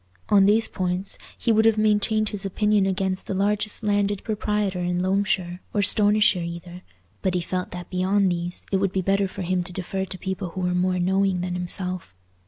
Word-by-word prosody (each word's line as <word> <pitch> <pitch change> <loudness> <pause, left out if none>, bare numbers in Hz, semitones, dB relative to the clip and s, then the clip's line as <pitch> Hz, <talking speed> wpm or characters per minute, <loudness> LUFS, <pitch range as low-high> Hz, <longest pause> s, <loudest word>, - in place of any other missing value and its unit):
On 200 -1 +6
these 220 +2 +4
points 185 +1 -3 0.2
he 235 - +1
would 220 0 +4
have 225 -1 +4
maintained 215 0 +2
his 205 -1 -1
opinion 205 0 +2
against 190 0 -1
the 195 - -2
largest 205 +2 0
landed 205 -1 0
proprietor 210 -3 -1
in 175 0 -1
Loamshire 185 -2 0 0.2
or 205 - +3
Stonyshire 205 -2 +4
either; 170 +1 -7 0.4
but 185 -1 0
he - - +2
felt 180 +1 -3
that 175 -1 -8
beyond 190 +1 +2
these 175 0 -3
it 195 - +3
would 195 -1 0
be 190 - 0
better 195 +1 +2
for 190 0 -6
him 180 +1 0
to 180 +1 -6
defer 190 +1 -3
to 185 0 -7
people 190 0 -4
who 185 +2 -6
were 180 0 0
more 180 +1 +1
knowing 190 0 +1
than 180 0 -3
himself. 180 - -3
190 Hz, 195 wpm, -24 LUFS, 180-205 Hz, 0.4 s, On